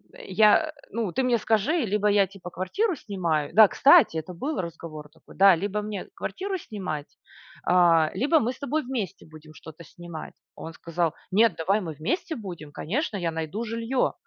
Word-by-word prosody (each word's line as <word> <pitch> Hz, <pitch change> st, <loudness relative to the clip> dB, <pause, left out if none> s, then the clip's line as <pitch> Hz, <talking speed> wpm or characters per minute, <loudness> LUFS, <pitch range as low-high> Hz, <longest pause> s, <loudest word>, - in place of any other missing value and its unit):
Я 315 Hz, -, +3 dB
э, -, -, -6 dB, 0.2 s
ну 220 Hz, -5 st, -2 dB
ты 260 Hz, -, 0 dB
мне 245 Hz, -2 st, +2 dB
скажи, 220 Hz, +6 st, +1 dB
либо 210 Hz, +1 st, 0 dB
я, 205 Hz, -1 st, +4 dB
типа, 185 Hz, -2 st, -11 dB
квартиру 325 Hz, -, -1 dB
снимаю" 170 Hz, -, -2 dB
Да, 215 Hz, -1 st, +9 dB
кстати, 285 Hz, -, +5 dB
это 170 Hz, +3 st, -5 dB
был 275 Hz, -, -3 dB
разговор 160 Hz, -3 st, -8 dB
такой. 160 Hz, -, -19 dB
Да: 195 Hz, -1 st, +7 dB
"Либо 205 Hz, +4 st, -2 dB
мне 210 Hz, -2 st, -5 dB
квартиру 385 Hz, 0 st, -4 dB
снимать, 185 Hz, -, -6 dB, 0.5 s
а, 170 Hz, -3 st, +4 dB
либо 285 Hz, -, +3 dB
мы 245 Hz, 0 st, -1 dB
с -, -, -17 dB
тобой 295 Hz, +2 st, -1 dB
вместе 240 Hz, -, -5 dB
будем 155 Hz, 0 st, -15 dB
что-то 160 Hz, +1 st, -12 dB
снимать". 170 Hz, 0 st, -10 dB, 0.2 s
Он 165 Hz, -, -8 dB
сказал: 170 Hz, -1 st, -2 dB, 0.2 s
"Нет, 220 Hz, +4 st, +4 dB
давай 195 Hz, +6 st, +1 dB
мы 165 Hz, -4 st, -5 dB
вместе 320 Hz, -, -3 dB
будем, 175 Hz, -9 st, -8 dB
конечно, 215 Hz, -, -3 dB
я 170 Hz, -3 st, -1 dB
найду 160 Hz, +7 st, -4 dB
жилье". 230 Hz, +3 st, -1 dB
195 Hz, 175 wpm, -26 LUFS, 165-235 Hz, 0.5 s, Да